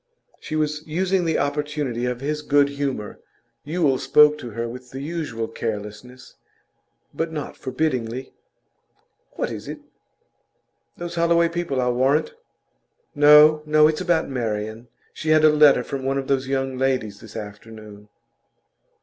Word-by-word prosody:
She 155 - -6
was 150 -1 -1
using 185 +3 0
the 160 -1 +1
opportunity 145 -4 -2
of 125 0 -4
his 150 +2 -2
good 145 -1 +3
humour. 140 -7 -4 0.4
Yule 150 -4 0
spoke 150 0 +5
to 120 - -7
her 115 +2 -4
with 125 +1 -9
the 135 - -8
usual 140 -7 -4
carelessness, 110 +3 -7 0.8
but 165 0 -3
not 150 -3 -6
forbiddingly. 130 -3 -3 1.0
'What - - -3
is - - -7
it? - - -6 1.2
Those 175 0 -6
Holloway 170 0 +2
people, 170 -5 -2
I'll 125 -1 +1
warrant.' 135 - +1 0.8
'No, 150 +1 +7
no! 155 0 +5
It's 155 +1 -1
about 175 -3 +1
Marian. 110 -2 -4 0.3
She 155 - -5
had 155 0 +5
a 155 - +8
letter 150 -4 +5
from 135 +2 -5
one 135 +1 -1
of 135 - -2
those 135 -1 0
young 135 -1 -2
ladies 130 -6 -1
this 110 -1 -14
afternoon. 105 0 -10
135 Hz, 140 wpm, -22 LUFS, 120-155 Hz, 1.2 s, a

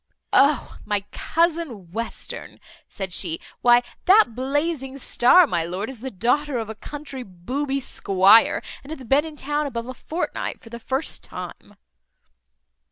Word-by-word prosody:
"O, 280 -2 +3
my 205 -1 -1
cousin 320 - -1
Western!" 230 +4 -6 0.3
said 190 -2 -6
she; 165 -3 0 0.2
"why, 240 0 +6 0.2
that 380 - +6
blazing 270 +2 -2
star, 275 +7 +5
my 175 - 0
lord, 185 +8 -4
is 255 - -12
the 265 - -4
daughter 250 +6 0
of 220 -2 -3
a - - -5
country 280 +3 -8
booby 255 +9 -3
squire, 200 -3 +4 0.2
and 275 - -13
hath 270 -6 -8
been 285 +5 +3
in 315 -1 -8
town 295 +1 -1
about 235 -4 -4
a 255 - -5
fortnight, 325 +6 -4
for 225 - -15
the 235 - -7
first 265 +6 -3
time." 205 - -9
255 Hz, 150 wpm, -23 LUFS, 215-290 Hz, 0.3 s, why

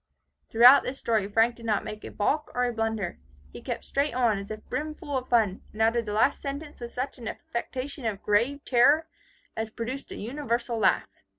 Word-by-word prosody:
'" - - -49
Throughout 245 +4 +8
this 265 - -4
story 220 -6 0
Frank 225 +3 +3
did 230 - -11
not 210 -2 +1
make 215 0 -7
a - - -6
balk 295 +9 0
or 250 - +2
a 245 - -1
blunder. 225 -4 -2 0.3
He - - -9
kept - - -5
straight 280 -2 0
on, 235 -5 +2
as 200 - -8
if 215 0 -8
brimful 305 -1 -4
of 255 -1 -3
fun, 215 -5 +2
and 215 - -11
uttered 230 +1 +2
the 210 - -4
last 225 +6 +2
sentence 285 0 -6
with 235 0 -6
such 255 +1 -4
an 230 - -7
affectation 255 +3 -5
of 205 -2 -4
grave 240 +8 +1
terror, 285 +6 +5 0.5
as 220 0 -3
produced 240 +5 -6
a - - -5
universal 235 -1 -2
laugh. - - +3
235 Hz, 205 wpm, -27 LUFS, 220-275 Hz, 0.5 s, Throughout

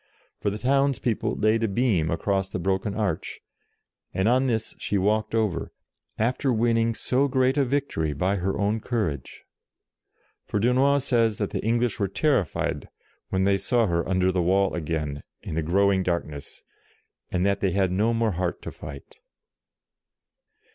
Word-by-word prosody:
For - - 0
the 100 - -4
town's 135 +3 +2
people 115 -4 -1
laid 110 +2 +2
a 115 - +2
beam 100 -6 +1
across 95 +3 0
the 95 - -3
broken 95 +3 -1
arch, 100 -7 -2 0.8
and 95 +3 +1
on 130 +3 +3
this 110 -3 -1
she 100 - -1
walked 105 +3 +1
over, 105 -6 -1 0.5
after 130 +4 +1
winning 115 0 +2
so 130 +5 +1
great 130 0 +2
a 145 - +3
victory 130 - -1
by 95 +7 0
her 95 +1 -1
own 105 +2 0
courage. 105 - -3 1.0
For 105 - -1
Dunois 130 +5 +3
says 115 -6 +2
that 105 - -2
the - - -3
English 115 0 +1
were 100 - +1
terrified 100 - 0 0.4
when 95 0 +1
they 100 0 +3
saw 120 +4 +2
her 85 -2 -1
under 95 0 +2
the 90 -1 0
wall 95 +2 +2
again, 75 -3 -3 0.2
in - - -5
the 80 - 0
growing 95 +4 +2
darkness, 85 -5 -4 0.7
and 90 0 0
that 100 0 +1
they 95 - +1
had 95 0 +1
no 105 +5 +2
more 115 -1 +1
heart 90 -1 -3
to - - -5
fight. 70 -2 -10
100 Hz, 160 wpm, -25 LUFS, 90-115 Hz, 1.0 s, on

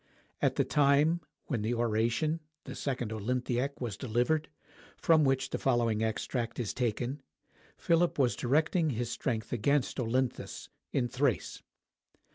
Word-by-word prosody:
At - - +2
the - - +3
time 150 +4 +3 0.2
when 120 -6 -2
the 115 +3 0
oration 120 +7 +1 0.2
(the - - -7
"Second 125 -5 -3
Olynthiac") 125 +4 -1
was 120 -6 -3
delivered, 130 +6 0 0.5
from 160 -2 +4
which 135 -1 +1
the - - -2
following 120 -4 +2
extract 115 +2 -2
is 115 -5 -2
taken, 125 +3 -2 0.6
Philip 170 +1 +2
was 125 -7 +3
directing 155 - +2
his 120 -2 -2
strength 115 -5 -2
against 135 +4 +1
Olynthus, 125 +1 -2 0.2
in 125 -2 +1
Thrace. 125 - -1
125 Hz, 130 wpm, -31 LUFS, 115-140 Hz, 0.6 s, from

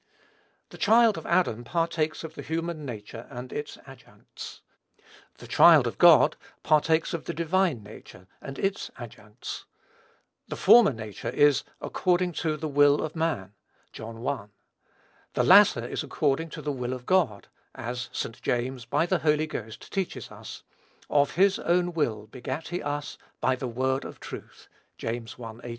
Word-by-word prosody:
The - - -13
child 225 0 +5
of - - -7
Adam 120 -11 +1
partakes 165 +2 -1
of 160 -1 -7
the - - -8
human 165 -1 -3
nature 115 -1 -8
and 125 -1 -8
its 145 - -5
adjuncts; 135 -1 -12 0.8
the - - -12
child - - +7
of - - -4
God - - +7 0.3
partakes 160 +1 +2
of 165 - -4
the - - -4
divine 170 - +1
nature 100 -3 -13 0.2
and 135 - -8
its 195 0 -2
adjuncts. 110 -1 -9 0.8
The - - -5
former 220 -2 +7
nature 110 -4 -6
is 145 -1 +4 0.2
according 180 -1 0
to 155 -2 0
"the 155 - -4
will 145 0 +4
of 155 +1 -5
man," 155 - -2 0.4
(John 115 +2 -8
i.,) 130 -8 -2 0.9
the - - +2
latter - - +6
is - - -3
according 150 +3 -1
to - - -8
"the 150 - -1
will 125 -2 -3
of 125 -1 -8
God;" 155 - +1 0.3
as 125 -1 -5
St. 115 - -5
James, 125 0 -2
by 120 +7 +1
the 175 0 +1
Holy 150 0 +2
Ghost, 110 -8 -8
teaches 195 -3 -3
us, - - -10 0.5
"of 140 -2 +2
his 195 +3 +4
own 175 0 +1
will 110 -10 -1
begat 130 +7 -6
he 175 +1 -3
us 145 0 -4 0.2
by 130 - +2
the 130 0 -5
word 130 +3 -1
of - - -9
truth." - - -10 0.3
(James 115 0 -5
i. 115 -2 -6
18.) 120 - -7
145 Hz, 160 wpm, -27 LUFS, 120-165 Hz, 0.9 s, child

